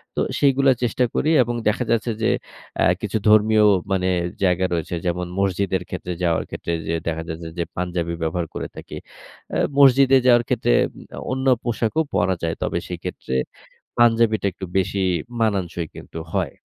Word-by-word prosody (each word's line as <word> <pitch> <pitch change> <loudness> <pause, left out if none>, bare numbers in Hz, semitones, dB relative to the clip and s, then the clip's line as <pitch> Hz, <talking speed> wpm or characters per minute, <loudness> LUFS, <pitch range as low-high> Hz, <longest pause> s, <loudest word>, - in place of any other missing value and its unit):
তো - - -1 0.2
সেইগুলা 135 -1 +4
চেষ্টা 120 +1 +1
করি 155 - +1
এবং 120 0 -3
দেখা 110 +4 +1
যাচ্ছে 115 0 +1
যে, - - +3 0.5
অ্যা - - +3 0.2
কিছু - - -1
ধর্মীয় 110 0 +5 0.3
মানে 95 -1 +1 0.4
জায়গা 90 -1 +2
রয়েছে 85 0 -2
যেমন, 90 0 -1
মসজিদের 95 -1 0
ক্ষেত্রে 90 -1 -4
যাওয়ার 85 -2 +1
ক্ষেত্রে 85 - -5 0.2
যে 85 - 0
দেখা 80 0 -2
যাচ্ছে 80 +1 -6
যে, 85 - 0
পাঞ্জাবি 85 -1 -2
ব্যবহার 80 +1 -1
করে - - -4
থাকি। - - -8 0.5
অ্যা - - -1 0.2
মসজিদে 135 -1 +6
যাওয়ার 120 -1 +6
ক্ষেত্রে - - +1 0.6
অন্য 130 +1 -2 0.2
পোশাকও 120 +5 0
পরা 90 +1 +2
যায়। 80 -1 -1
তবে - - -1
সেক্ষেত্রে 65 - -5 0.6
পাঞ্জাবিটা 115 -2 +3
একটু 95 +1 -7
বেশি 95 +1 0 0.4
মানাংশই 95 -6 -1
কিন্তু 80 - -9
হয়। 95 -8 -1
95 Hz, 155 wpm, -22 LUFS, 85-115 Hz, 0.6 s, মসজিদে